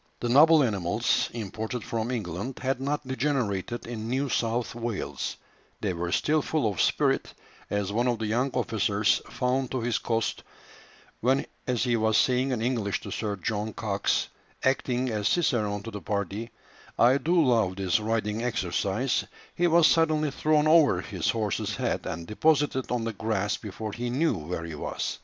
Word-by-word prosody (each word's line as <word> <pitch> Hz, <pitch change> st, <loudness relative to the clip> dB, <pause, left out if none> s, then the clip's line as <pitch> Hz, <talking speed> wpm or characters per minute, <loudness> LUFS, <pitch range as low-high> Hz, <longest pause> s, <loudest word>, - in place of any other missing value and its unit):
The 120 Hz, -, -2 dB
noble 155 Hz, +4 st, +7 dB
animals, 105 Hz, -1 st, +1 dB
imported 110 Hz, +2 st, -4 dB
from 115 Hz, -1 st, -2 dB
England, 110 Hz, +1 st, -4 dB
had 130 Hz, 0 st, 0 dB
not 145 Hz, 0 st, -2 dB
degenerated 125 Hz, -6 st, -1 dB
in 115 Hz, -1 st, -5 dB
New 135 Hz, +3 st, 0 dB
South 115 Hz, 0 st, 0 dB
Wales; 115 Hz, -3 st, -4 dB, 0.4 s
they 100 Hz, -3 st, -1 dB
were 85 Hz, 0 st, -3 dB
still 155 Hz, -, +2 dB
full 150 Hz, -5 st, 0 dB
of 95 Hz, -, -1 dB
spirit -, -, +1 dB, 0.4 s
as 100 Hz, -1 st, -1 dB
one 120 Hz, +3 st, +1 dB
of 120 Hz, -1 st, +1 dB
the 110 Hz, -, -3 dB
young 120 Hz, +5 st, +1 dB
officers 105 Hz, -4 st, +1 dB
found 130 Hz, 0 st, 0 dB
to 130 Hz, -, -2 dB
his 115 Hz, -1 st, 0 dB
cost, 115 Hz, -1 st, -1 dB, 0.8 s
when, 130 Hz, +3 st, +2 dB, 0.2 s
as 125 Hz, -3 st, +1 dB
he 120 Hz, -2 st, +2 dB
was 110 Hz, -1 st, +2 dB
saying 130 Hz, +1 st, +2 dB
in 115 Hz, -3 st, -1 dB
English 115 Hz, -5 st, -1 dB
to -, -, -8 dB
Sir 105 Hz, -2 st, -2 dB
John 110 Hz, 0 st, -3 dB
Cox, -, -, 0 dB, 0.3 s
acting 130 Hz, -1 st, +1 dB
as 105 Hz, -1 st, 0 dB
cicerone 110 Hz, -, +1 dB
to 115 Hz, -, -6 dB
the 105 Hz, -1 st, -6 dB
party, 100 Hz, +4 st, -3 dB, 0.5 s
"I 125 Hz, +4 st, +5 dB
do 170 Hz, +4 st, +2 dB
love 115 Hz, -, +3 dB
this 95 Hz, +3 st, +1 dB
riding 110 Hz, 0 st, -1 dB
exercise," 110 Hz, +1 st, 0 dB, 0.3 s
he 175 Hz, -, +2 dB
was 170 Hz, -1 st, +5 dB
suddenly 155 Hz, -2 st, +3 dB
thrown 155 Hz, +1 st, +2 dB
over 155 Hz, -, +5 dB
his 95 Hz, -5 st, -2 dB
horse's 110 Hz, -4 st, -1 dB
head -, -, -2 dB
and 85 Hz, +1 st, -4 dB
deposited 140 Hz, -, +1 dB
on 120 Hz, -2 st, -1 dB
the 115 Hz, 0 st, -2 dB
grass 105 Hz, -1 st, -1 dB
before 105 Hz, +1 st, -6 dB
he 120 Hz, +3 st, -4 dB
knew 135 Hz, +2 st, +1 dB
where 80 Hz, 0 st, -4 dB
he 85 Hz, -, -6 dB
was. 75 Hz, -, -4 dB
115 Hz, 170 wpm, -27 LUFS, 105-130 Hz, 0.8 s, noble